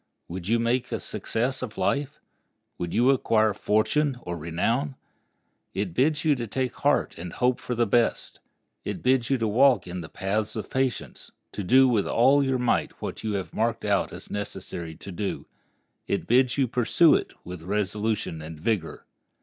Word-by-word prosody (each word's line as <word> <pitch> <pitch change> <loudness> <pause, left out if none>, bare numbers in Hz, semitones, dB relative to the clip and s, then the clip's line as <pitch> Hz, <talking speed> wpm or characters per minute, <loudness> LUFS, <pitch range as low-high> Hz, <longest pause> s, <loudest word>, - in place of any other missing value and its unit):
Would 90 +1 -6
you 115 +2 +3
make 120 +2 0
a - - -1
success 125 +4 -2
of 120 -5 -6
life? 140 +9 -1 0.6
Would 85 -1 -3
you 125 +3 +4
acquire 110 -5 +2
fortune 125 +8 +1
or 85 - -4
renown? 115 - -1 0.8
It 95 -3 -2
bids 145 - +1
you 155 - +5
take 125 +1 -2
heart - - +1
and 85 0 -6
hope 125 0 +1
for 125 - -4
the 120 0 +2
best. 115 +2 +1 0.4
It - - -5
bids 130 -2 +2
you 135 - +3
walk 120 -2 +4
in 90 0 -5
the 80 - -9
paths 105 +3 -2
of 110 - -5
patience, 130 -3 -2 0.2
to 105 - -5
do 130 +7 +6
with 115 -5 +1
all 135 +4 +4
your 135 -1 +1
might 125 -1 0
what - - -6
you 110 -1 -1
have 95 -2 -4
marked - - -1
out - - +1
as - - -9
necessary 90 -5 -5
to 95 - -9
do. 100 +3 -4 0.6
It - - -1
bids 125 +2 +3
you 135 -2 +3
pursue 125 +7 +4
it - - 0
with 90 -2 -8
resolution 105 -1 -2
and 80 0 -8
vigor. 95 -2 -2
115 Hz, 175 wpm, -26 LUFS, 95-130 Hz, 0.8 s, do